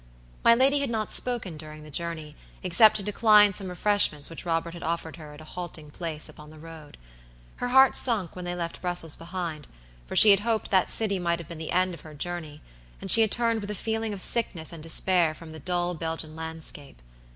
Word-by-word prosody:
My 235 - +7
lady 270 +4 +4
had 280 -2 -1
not 220 -2 -3
spoken 230 -10 -1
during 155 0 -10
the 155 - -12
journey, 160 -1 -3 0.3
except 185 +5 +5
to 200 - -1
decline 210 0 +4
some 195 0 -4
refreshments 180 -6 +2
which 165 - -8
Robert 165 0 -1
had 170 - -10
offered 165 0 -4
her 150 -2 -11
at 150 - -13
a 155 - -13
halting 160 -4 -8
place 160 -2 -4
upon 150 0 -13
the 155 - -14
road. 160 -1 -12 0.6
Her 245 - -3
heart 265 +1 +5
sunk 215 -9 +1
when 180 - -7
they 175 0 -4
left 170 -1 -5
Brussels 175 -3 -2
behind, 165 -4 -6 0.4
for - - -7
she 215 - +9
had 200 - +5
hoped 225 +1 -2
that 190 -2 +2
city 200 -4 0
might 170 -1 -1
have 170 -3 -10
been 170 -2 -8
the 160 - -6
end 185 0 +1
of 170 - -10
her 155 -1 -13
journey, 155 -2 -5 0.4
and - - 0
she 225 - +8
had 220 - +3
turned 230 -2 0
with 205 - -7
a 210 - -3
feeling 225 +2 -3
of 200 -2 -5
sickness 180 -9 0
and 165 - -8
despair 165 0 +2
from 165 -1 -12
the 160 - -8
dull 175 +2 -1
Belgian 160 -1 -4
landscape. 160 - -6
175 Hz, 220 wpm, -26 LUFS, 160-205 Hz, 0.6 s, she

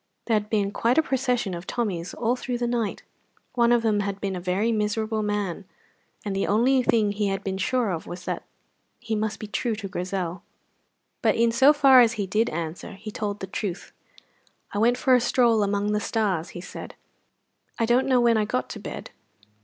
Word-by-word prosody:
There 230 - 0
had 210 -1 +1
been 205 -2 +1
quite 235 +5 +1
a 320 - +5
procession 250 -7 0
of 175 +1 -7
Tommies 185 -8 -3
all 240 +1 0
through 250 -1 -3
the 240 - -1
night; 235 -3 -2 0.5
one 240 -1 +3
of 240 -1 +3
them 215 -2 +2
had 200 -1 -2
been 195 -2 -2
a - - -3
very 190 +6 0
miserable 215 0 -1
man, 205 -3 -2 0.6
and 200 -2 -2
the 195 - 0
only 250 +6 +3
thing 220 -4 +2
he 205 0 -1
had 195 0 -2
been 190 -1 -3
sure 235 +1 +1
of 165 -2 -4
was 180 +1 -8
that - - -3 0.6
he 230 -3 -3
must 215 0 -2
be - - -5
true 220 +2 -2
to 205 -2 -6
Grizel. 180 -2 -3 0.8
But - - +3
in 230 0 +3
so 265 +5 +6
far 275 -3 +7
as 235 -1 +4
he 210 -4 -2
did 215 +5 +1
answer 165 +1 -5
he 210 +2 -8
told 205 -1 -4
the - - -2
truth. 190 -1 -5 0.8
"I 205 - -2
went 240 +3 +3
for 260 0 +3
a 250 - +5
stroll 235 -2 +3
among 205 0 0
the 210 - +1
stars," 200 -6 -1
he - - -6
said. - - -9 0.8
"I 230 - +1
don't 245 +3 +2
know 255 -2 +4
when 235 -2 +4
I 215 - +2
got 125 -10 -2
to - - -7
bed. - - -7
215 Hz, 210 wpm, -25 LUFS, 195-235 Hz, 0.8 s, far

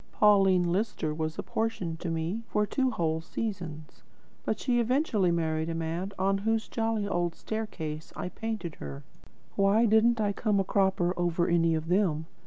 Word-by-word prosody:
Pauline 195 -4 +4
Lister 190 -5 -1
was 155 0 -3
apportioned 190 -8 -2
to 175 - -3
me 165 +7 -2
for 210 +3 +1
two 260 +4 +1
whole 160 -7 -1
seasons, 165 -5 -5 0.4
but - - -1
she 245 -2 +1
eventually 235 - +2
married 160 -1 0
the 165 - -2
man 165 +4 -3
on 195 +1 +1
whose 225 +2 0
jolly 225 -2 -1
old 175 -3 -1
staircase 160 -9 -5
I 180 - -4
painted 220 -6 -4
her. 70 0 -7 0.5
Why 200 +4 +4
didn't 225 +2 +4
I 205 -1 +1
come 210 -1 +1
a - - +3
cropper 190 -2 +1
over 175 0 +1
any 165 -1 +3
of 160 0 -3
them? 175 -4 +1
185 Hz, 165 wpm, -29 LUFS, 165-215 Hz, 0.5 s, Pauline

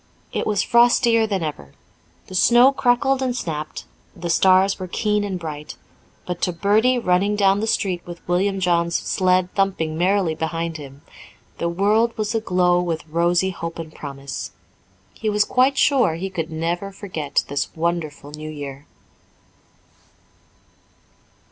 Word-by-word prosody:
It - - -2
was 205 -2 +1
frostier 235 -1 +4
than 195 -5 -1
ever. 110 - -6 0.5
The - - -12
snow 240 +7 +6
crackled 270 +1 +1
and 255 -2 -1
snapped, 155 -8 -5 0.3
the 170 -1 -3
stars 190 +3 +4
were 185 - -5
keen 210 +2 0
and 195 -2 -3
bright, 150 -2 -7 0.5
but 180 -1 -5
to 180 - +1
Bertie, 210 +8 +2
running 200 -1 +1
down 195 -1 +3
the 220 - -2
street 185 -5 0
with 175 -1 -11
William 190 +3 +1
John's 170 -2 +1
sled 185 -1 +1
thumping 165 -5 -1
merrily 185 -2 +2
behind 165 +1 -3
him, 140 -1 -12 0.6
the 170 - 0
world 210 +6 +1
was 215 0 -2
aglow 180 -5 +2
with 165 -3 -3
rosy 175 +3 +1
hope 170 -2 -6
and 160 -2 -7
promise. 140 -2 -7 0.6
He 220 - -3
was 210 0 +2
quite 265 +2 +2
sure 245 - +3
he 190 +3 -5
could 165 -4 -3
never 170 +5 -2
forget 180 -8 -2
this 140 0 -2
wonderful 160 -3 -3
New 155 +1 -7
Year. 145 -2 -8
180 Hz, 145 wpm, -21 LUFS, 160-205 Hz, 0.6 s, snow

